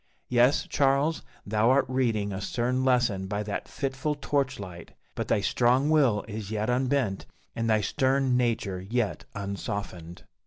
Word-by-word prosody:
Yes, 125 +3 +3
Charles, 140 +3 +2 0.2
thou 110 +3 +2
art 135 +2 +4
reading 115 -6 0
a 95 - -4
stern 125 +3 -1
lesson 120 -7 +2
by 105 +2 -2
that 105 -1 -4
fitful 135 +2 -2
torch 140 -3 -1
light; 90 -4 -9 0.2
but - - -4
thy - - +2
strong 125 +7 +2
will 130 -10 +3
is 105 -2 -6
yet 110 +2 -1
unbent, 125 -5 0 0.3
and 115 0 -1
thy 110 -1 +3
stern 130 +3 +1
nature 110 -6 0
yet 110 +3 -2
unsoftened. 100 -4 -5
120 Hz, 150 wpm, -27 LUFS, 100-130 Hz, 0.3 s, art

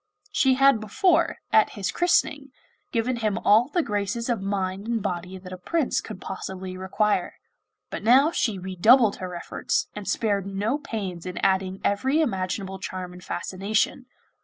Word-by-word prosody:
She 265 -1 +3
had 275 -3 +5
before, 215 - +2 0.2
at 220 - +5
his 195 - -1
christening, 290 -5 +1 0.4
given 240 +2 0
him 215 -2 0
all 225 +2 +4
the 345 +2 +1
graces 210 +2 -2
of 230 -5 0
mind 195 0 -2
and 235 -1 0
body 180 -1 -4
that 185 0 -10
a 185 - -8
prince 300 - 0
could 215 -4 -9
possibly 190 -1 -6
require; 190 +3 0 0.6
but - - -4
now 265 +8 +5
she 225 - 0
redoubled 200 +5 +4
her 180 -1 -6
efforts, 170 - -2
and 210 -1 -7
spared 200 -3 0
no 205 +8 -1
pains 190 - -5
in 180 - -6
adding 190 0 +1
every 260 +9 +1
imaginable 190 - -2
charm 185 -1 -6
and 180 0 -12
fascination. 215 +6 -1
205 Hz, 160 wpm, -25 LUFS, 190-235 Hz, 0.6 s, had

